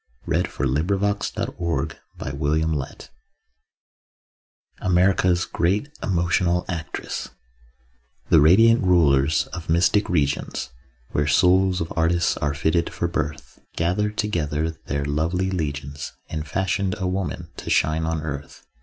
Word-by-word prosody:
READ - - +1
AT - - -16
THE 70 - +1
BENEFIT 100 +3 -1
OF - - -3
CLARA 75 -1 -2
MORRIS 75 -4 -4 1.7
(AMERICA'S 90 -1 +3
GREAT 100 - 0
EMOTIONAL 85 -1 +1
ACTRESS) 85 -3 -5 1.0
The 80 - +7
Radiant 115 +9 +6
Rulers 80 -6 +3
of 85 -2 -7
Mystic 85 +5 +3
Regions 70 -6 -1 0.4
Where 75 0 0
souls 90 +4 +4
of 80 - -4
artists 85 +1 +2
are 70 -1 -1
fitted 80 +4 +1
for 85 - -2
birth 75 -3 -4 0.2
Gathered 105 +5 0
together 80 -6 -1
their 70 -3 -4
lovely 85 +6 0
legions 70 -4 -4 0.2
And 75 -1 -4
fashioned 95 +4 0
a 95 - -3
woman 90 -3 -3
to - - -6
shine 80 +2 +2
on 80 -1 -2
earth. 70 -2 -7
85 Hz, 120 wpm, -23 LUFS, 75-95 Hz, 1.7 s, The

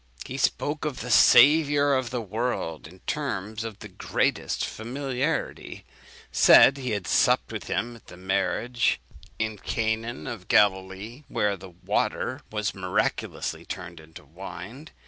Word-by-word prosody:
He 130 +2 -6
spoke 145 +4 0
of 145 -5 -3
the 125 - -4
Saviour 145 +4 +6
of 130 -3 0
the 125 -1 -3
world 110 -7 -3
in 90 +3 -16
terms 110 -7 -3
of 110 -3 -6
the 105 - -9
greatest 95 - -1
familiarity; 135 +5 -3 0.5
said 140 - +7
he 130 -2 -4
had 100 -4 -2
supped - - +2
with - - -5
him 120 +1 -2
at - - -23
the - - -12
marriage 95 +6 0 0.4
in 110 -2 -2
Canaan 115 +3 -2
of 115 -8 -7
Galilee, 100 +6 +1
where 105 -1 0
the 95 0 -11
water 120 - -2
was 105 -2 -1
miraculously 90 -1 -2
turned 85 -1 -7
into 80 +1 -14
wine. 95 - -9
110 Hz, 140 wpm, -26 LUFS, 95-130 Hz, 0.5 s, said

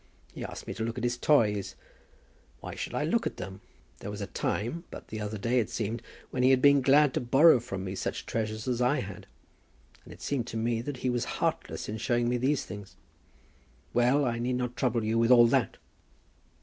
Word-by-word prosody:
He - - -7
asked - - -7
me - - -5
to 110 - -4
look 115 +1 -3
at 120 - -4
his 120 0 +1
toys. 110 -7 +2 0.8
Why - - -7
should - - -5
I - - 0
look - - +1
at - - -6
them? 95 +1 -7 0.4
There - - -6
was 105 0 -6
a 100 - -3
time, 120 +12 -2
but - - -10
the 110 0 -5
other 105 +1 -4
day 120 +5 +1
it 110 - -1
seemed, 115 +1 -3 0.3
when 125 - -1
he 130 - +5
had 130 -1 +5
been 140 +1 +6
glad 140 +1 +5
to - - 0
borrow 135 +4 +6
from 95 -5 -5
me 95 0 -4
such 95 - -4
treasures 110 0 -3
as 125 -1 0
I 125 +5 +2
had. 95 -1 -8 0.8
And - - -14
it - - -12
seemed 130 -5 -1
to 115 - -5
me 115 0 0
that 135 +2 -5
he 125 - +2
was 120 -1 -1
heartless - - -2
in 105 - -4
showing 120 +2 +1
me 125 - +1
these 135 +3 0
things. 100 -2 -9 1.0
Well; 125 +4 +3
I 115 -1 -1
need 125 +1 -1
not 125 -1 -2
trouble 120 -3 0
you 110 +1 +1
with 115 0 +3
all 120 -2 +8
that." 115 - +1
120 Hz, 220 wpm, -29 LUFS, 110-125 Hz, 1.0 s, all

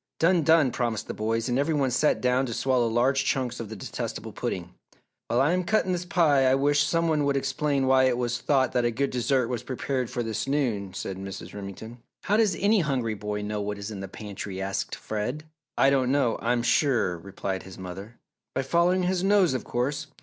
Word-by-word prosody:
"Done! 170 +1 +3
Done!" 155 -3 +4
promised 120 -3 -2
the - - -4
boys, 115 +2 -1
and 125 +1 +1
every 155 +3 +1
one 135 -3 +1
sat 150 +5 +2
down 125 +1 +2
to 115 - -4
swallow 130 -3 +2
large 130 +4 +2
chunks 130 -4 -1
of 115 -3 -6
the 110 - -6
detestable 95 - -5
pudding. 90 0 -4 0.5
"While 120 - +1
I 145 +4 +3
am 180 0 +1
cutting 190 0 +1
this 180 0 -2
pie 150 -7 +3
I 130 - +4
wish 145 +1 +3
some 165 +2 +1
one 155 -2 +2
would 140 -1 +1
explain 140 0 0
why 130 0 +5
it 125 -2 +2
was 120 -1 -1
thought 135 -3 +2
that 125 -1 +1
a 120 - +2
good 135 +4 -1
dessert 125 0 +1
was 120 -2 -3
prepared 130 0 -3
for 120 - -2
this 115 +2 -3
noon," 115 -10 -1
said 95 - -4
Mrs. 95 0 -7
Remington. 105 +4 -8 0.2
"How 205 - +1
does 215 -5 +3
any 210 +2 +4
hungry 130 -9 0
boy 105 0 -4
know 105 0 -3
what 105 0 -3
is 100 +2 -6
in 100 - -6
the 95 - -5
pantry?" 100 -1 -7
asked 95 0 -3
Fred. 110 +8 -4 0.3
"I 135 - +5
don't 130 -2 +2
know, 135 -5 +1
I'm 120 0 +1
sure," 120 - +2
replied 95 +1 -4
his 95 -1 -11
mother. 95 +5 -8 0.4
"By - - 0
following 175 +6 +2
his 180 0 0
nose, 195 -6 +4
of 130 - -3
course! 140 +5 -2
130 Hz, 215 wpm, -26 LUFS, 110-145 Hz, 0.5 s, why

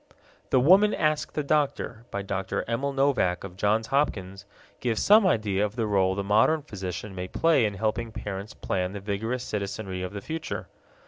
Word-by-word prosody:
The 130 - +4
Woman 190 +10 +5
Asks 155 -1 0
the 150 - -1
Doctor, 140 -6 -1
by 100 - -4
Dr. 100 0 -3
Emil 130 +5 -1
Novak 135 -10 +1
of 95 -2 -8
Johns 105 +3 +1
Hopkins, 100 -8 -1 0.3
gives 115 -3 -1
some 210 -1 +6
idea 105 - +1
of 105 +1 -2
the 115 -2 0
role 95 -2 +2
the 100 - -2
modern 110 +10 +3
physician 95 - -6
may 90 0 -5
play 155 - +3
in 105 -1 -2
helping 110 +3 -1
parents 100 -1 -6
plan 90 0 -2
the 100 - -5
vigorous 110 +5 -3
citizenry 100 -3 -4
of 90 +1 -5
the 100 - -5
future. 160 +7 -5
105 Hz, 180 wpm, -27 LUFS, 95-135 Hz, 0.3 s, some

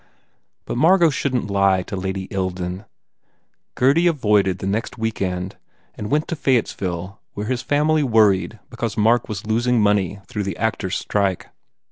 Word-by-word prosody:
But - - -4
Margot 170 +3 +5
shouldn 130 -3 -1
t 100 - -5
lie 100 -2 +3
to 100 - -6
Lady 95 0 -3
Ilden. 95 0 -3 0.9
Gurdy 145 +7 +3
avoided 105 - +2
the 95 - -6
next 105 +6 -2
week 110 -2 -3
end 90 0 -3 0.4
and 105 - -6
went 150 +4 +1
to 170 - -1
Fayettesville 100 - -1
where 105 - -4
his 125 +2 -1
family 150 +2 +2
worried 110 -6 +3
because 115 -2 -4
Mark 115 +3 +3
was 105 -2 -5
losing 120 +2 +1
money 100 -2 +1
through 105 - -4
the 95 - -4
actors 105 -4 -1
strike. 100 -3 -1
105 Hz, 155 wpm, -21 LUFS, 95-125 Hz, 0.9 s, Margot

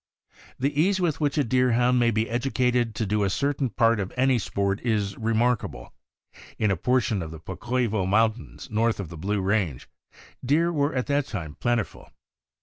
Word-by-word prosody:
The 140 +3 +1
ease 190 +3 +2
with 165 -4 0
which 145 0 0
a 145 - +3
Deerhound 125 0 +2
may 120 -1 +3
be 110 0 0
educated 125 -1 0
to 110 - -1
do 105 +1 0
a 100 - +1
certain 140 +4 0
part 115 -1 +2
of 95 -2 -3
any 130 -1 +3
sport 100 -1 -1
is 105 -5 -1
remarkable. 115 +1 -1 0.6
In 105 -2 +1
a - - +2
portion 115 +1 +1
of 80 - -5
the 80 0 -9
Pocoivo 105 +3 -2
Mountains, 110 +4 0
north 115 +1 +1
of 95 -6 -5
the 85 - -9
Blue 100 +5 -1
Range, 95 - -1 0.6
deer 165 +6 +2
were 145 -1 0
at 125 - 0
that 145 -1 0
time 80 - -5
plentiful. 120 +5 -2
115 Hz, 175 wpm, -25 LUFS, 100-130 Hz, 0.6 s, a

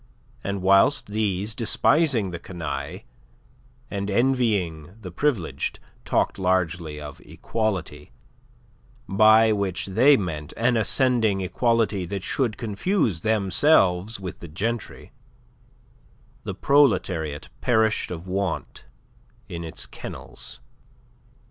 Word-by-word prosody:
And 100 -1 -3
whilst 110 +7 +4
these, 105 -1 -1
despising 120 - +2
the 85 - -6
canaille, 85 -3 -5 0.9
and 100 0 -3
envying 100 - 0
the 95 -5 -8
privileged, 115 - -1 0.3
talked - - 0
largely 85 -4 0
of 75 -1 -9
equality 95 - -4 1.0
by 110 +3 +5
which 100 -3 -1
they 125 +9 +5
meant 80 - -5
an 120 +1 +2
ascending 115 -2 +2
equality 105 -1 0
that 100 0 -4
should 120 -6 -1
confuse 115 - 0
themselves 100 - +3
with 95 -2 -7
the 85 - -9
gentry 110 +8 -4 1.3
the - - -4
proletariat 95 - +2
perished 110 -2 +2
of 85 0 -6
want 95 -2 -3 0.6
in 85 0 -6
its 80 - -5
kennels. 105 - -9
100 Hz, 100 wpm, -24 LUFS, 90-115 Hz, 1.3 s, by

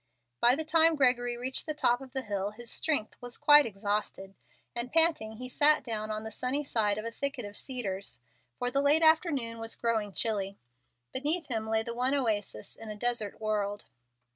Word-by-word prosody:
By 245 +2 +5
the 315 +2 -4
time 325 +1 +4
Gregory 245 -3 +2
reached 255 +5 -3
the 310 - -2
top 245 -3 +2
of 265 -1 -11
the 265 0 -3
hill 200 -2 -2
his 230 +3 -9
strength 290 -9 -1
was 245 -1 -6
quite 295 -1 +7
exhausted, 200 -2 -3 0.4
and, 240 +1 -4
panting, 320 -10 +3
he 250 +3 -7
sat 295 +4 +4
down 215 -2 -3
on 215 0 -3
the 220 - -6
sunny 255 +6 0
side 210 -7 0
of 215 - -5
a 230 - -3
thicket 275 -1 -3
of 205 0 -9
cedars, 200 -8 -3 0.4
for 245 0 -1
the 275 - +1
late 295 +3 +5
afternoon 290 -8 +3
was 225 0 -2
growing 220 -3 -1
chilly. 200 -2 -2 0.6
Beneath 300 +6 -1
him 220 -2 -2
lay 220 0 +1
the 235 - -5
one 250 +3 +1
oasis 210 - -2
in 225 - -10
a 210 - -5
desert 225 -2 -2
world. 205 -1 -2
240 Hz, 190 wpm, -29 LUFS, 215-275 Hz, 0.6 s, quite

